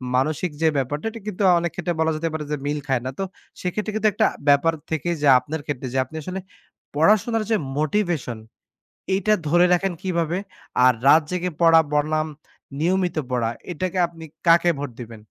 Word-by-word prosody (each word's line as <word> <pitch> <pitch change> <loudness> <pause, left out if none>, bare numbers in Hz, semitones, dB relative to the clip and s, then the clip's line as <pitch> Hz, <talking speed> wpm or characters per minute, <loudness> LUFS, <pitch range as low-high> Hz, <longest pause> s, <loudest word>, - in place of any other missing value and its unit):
মানসিক 155 +5 0
যে 160 - +4
ব্যাপারটা 145 - -2
এটা 230 - -9
কিন্তু 200 0 -2 0.2
অনেক 170 -2 -2
ক্ষেত্রে 175 -1 -2
বলা 160 0 +2
যেতে 165 +1 -2
পারে 155 -1 -3
যে 150 - 0
মিল 145 +1 -1
খায় 130 -3 +1
না। - - -1
তো - - 0 0.4
সেক্ষেত্রে 210 +4 -2
কিন্তু 215 0 +2
একটা 215 +1 +3 0.2
ব্যাপার 145 +3 +4 0.2
থেকেই 165 +2 -1
যা 140 - +5
আপনার 155 +2 -5
ক্ষেত্রে। 135 -3 -4
যে - - -1
আপনি 160 - -14
আসলে 185 +3 -4 0.6
পড়াশোনার 215 +7 +3
যে - - +5 0.2
motivation 155 - -1 0.8
এটা 215 +2 +2
ধরে 175 +3 +5
রাখেন 190 +1 0
কিভাবে? 170 -1 -1 0.5
আর 130 - +7
রাত 155 +3 +7
জেগে 180 0 -2
পড়া 165 -1 +7
বনাম 155 +1 +1 0.5
নিয়মিত 180 0 +1
পড়া 120 -2 0 0.2
এটাকে 185 +2 -3
আপনি 165 -1 -12 0.2
কাকে 170 +1 +5
ভোট 140 -2 -4
দিবেন? 115 -2 -9
165 Hz, 175 wpm, -23 LUFS, 145-180 Hz, 0.8 s, আর